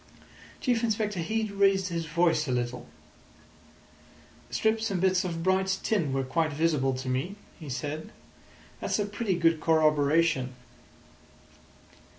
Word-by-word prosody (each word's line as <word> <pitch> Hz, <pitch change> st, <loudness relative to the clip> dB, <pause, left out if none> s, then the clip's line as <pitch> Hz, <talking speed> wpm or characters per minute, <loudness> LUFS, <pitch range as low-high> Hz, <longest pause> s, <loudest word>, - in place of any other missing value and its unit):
Chief 245 Hz, -3 st, +1 dB
Inspector 210 Hz, -4 st, 0 dB
Heat 220 Hz, +5 st, -1 dB
raised 195 Hz, -1 st, +3 dB
his 165 Hz, -1 st, -3 dB
voice 165 Hz, -1 st, +2 dB
a -, -, -1 dB
little. 125 Hz, 0 st, -2 dB, 1.6 s
"Strips 220 Hz, 0 st, +1 dB
and 195 Hz, -3 st, -1 dB
bits 185 Hz, 0 st, +2 dB
of 165 Hz, -2 st, -3 dB
bright 190 Hz, +1 st, +2 dB
tin 175 Hz, -11 st, +1 dB
were 135 Hz, 0 st, 0 dB
quite 155 Hz, +4 st, 0 dB
visible 145 Hz, -3 st, +1 dB
to 130 Hz, 0 st, -6 dB
me," 130 Hz, +10 st, -2 dB, 0.2 s
he 155 Hz, -4 st, -8 dB
said. 145 Hz, +5 st, -4 dB, 0.7 s
"That's -, -, -1 dB
a 205 Hz, -, 0 dB
pretty 205 Hz, -1 st, -2 dB
good 165 Hz, -2 st, +2 dB
corroboration." 155 Hz, -3 st, +2 dB
165 Hz, 130 wpm, -28 LUFS, 145-195 Hz, 1.6 s, raised